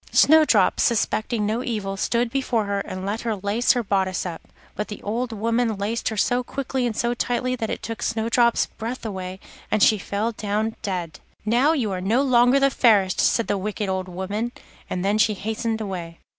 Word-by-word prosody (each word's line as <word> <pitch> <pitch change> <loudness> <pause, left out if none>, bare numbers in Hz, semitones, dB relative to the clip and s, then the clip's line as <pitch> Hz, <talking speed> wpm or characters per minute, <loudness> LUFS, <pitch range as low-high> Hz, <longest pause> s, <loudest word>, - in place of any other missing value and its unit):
Snowdrop, 300 -10 +5
suspecting 220 -1 +1
no 220 +4 -1
evil, 205 -5 -3
stood 235 +4 0
before 245 -5 0
her 200 0 -1
and 185 -1 -5
let 210 +3 -2
her 225 -2 -1
lace 205 +5 +2
her 245 -2 -1
bodice 190 -3 0
up, 170 -3 -5 0.3
but 210 - -3
the 210 - -7
old 235 +4 -2
woman 230 +1 0
laced 210 +4 -1
her 220 - -5
so 245 +4 +1
quickly 260 -1 -2
and 220 - -4
so 240 0 +1
tightly 245 +1 -1
that 225 -3 -3
it - - -4
took 225 -1 -5
Snowdrop's 230 +1 +2
breath 235 +2 -6
away, 190 -3 -5 0.3
and 215 - +2
she 215 - +5
fell 205 +5 -2
down 215 +1 -2
dead. 175 -6 -4 0.3
'Now 245 +8 +3
you 240 -10 -1
are 185 -1 -3
no 225 +8 +2
longer 250 0 +4
the 275 0 +3
fairest,' 205 -8 +3
said 230 - +2
the 205 - -1
wicked 210 +1 -3
old 190 0 -2
woman, 200 +6 -3 0.4
and 185 +1 -2
then 205 +2 +2
she 215 -1 +3
hastened 220 +2 -2
away. 175 -5 -5
220 Hz, 195 wpm, -23 LUFS, 200-240 Hz, 0.4 s, Snowdrop